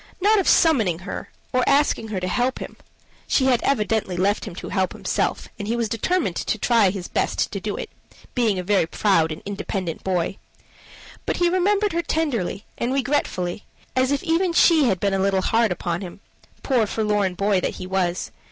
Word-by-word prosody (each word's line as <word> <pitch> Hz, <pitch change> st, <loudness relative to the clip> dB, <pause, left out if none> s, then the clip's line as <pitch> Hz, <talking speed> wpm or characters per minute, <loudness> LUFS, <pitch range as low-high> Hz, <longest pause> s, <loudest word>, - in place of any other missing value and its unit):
Not 420 Hz, +3 st, +4 dB
of 380 Hz, -, -1 dB
summoning 225 Hz, -, +4 dB
her, -, -, -6 dB, 0.2 s
or 255 Hz, 0 st, +3 dB
asking 280 Hz, -5 st, +2 dB
her 210 Hz, -3 st, -3 dB
to 185 Hz, -, -3 dB
help 250 Hz, +6 st, 0 dB
him, -, -, -8 dB, 0.5 s
she 260 Hz, -, +2 dB
had 250 Hz, -3 st, +3 dB
evidently 215 Hz, -7 st, 0 dB
left 200 Hz, +3 st, +1 dB
him -, -, -8 dB
to -, -, -7 dB
help 190 Hz, -1 st, 0 dB
himself, -, -, -2 dB
and 205 Hz, -, -4 dB
he 230 Hz, -, 0 dB
was 235 Hz, -1 st, 0 dB
determined 355 Hz, -, -1 dB
to -, -, -1 dB
try 230 Hz, -5 st, +3 dB
his 185 Hz, -2 st, -5 dB
best -, -, -1 dB
to -, -, -3 dB
do -, -, -4 dB
it, -, -, -5 dB, 0.5 s
being 225 Hz, -6 st, +1 dB
a 180 Hz, -, -2 dB
very 190 Hz, -3 st, +2 dB
proud 165 Hz, -4 st, +2 dB
and 155 Hz, -, -7 dB
independent 195 Hz, -4 st, -4 dB
boy, 185 Hz, 0 st, -1 dB, 0.9 s
but -, -, 0 dB
he 350 Hz, -1 st, +3 dB
remembered 400 Hz, +3 st, +2 dB
her 340 Hz, -, +1 dB
tenderly 250 Hz, -, -2 dB
and 250 Hz, +3 st, 0 dB
regret 275 Hz, +2 st, +1 dB
fully, 180 Hz, +2 st, -4 dB, 0.3 s
as 260 Hz, +1 st, +2 dB
if 285 Hz, -, 0 dB
even 345 Hz, +1 st, +1 dB
she 325 Hz, -3 st, +5 dB
had 190 Hz, -7 st, +1 dB
been 200 Hz, 0 st, 0 dB
a 195 Hz, -, +1 dB
little 195 Hz, -1 st, +2 dB
hard 225 Hz, -2 st, +2 dB
upon 175 Hz, 0 st, -2 dB
him 185 Hz, 0 st, -8 dB, 0.4 s
poor, 245 Hz, -6 st, +2 dB
forlorn 210 Hz, -4 st, 0 dB
boy 200 Hz, 0 st, +1 dB
that -, -, -2 dB
he -, -, -7 dB
was. 185 Hz, -1 st, -1 dB
210 Hz, 200 wpm, -23 LUFS, 185-275 Hz, 0.9 s, she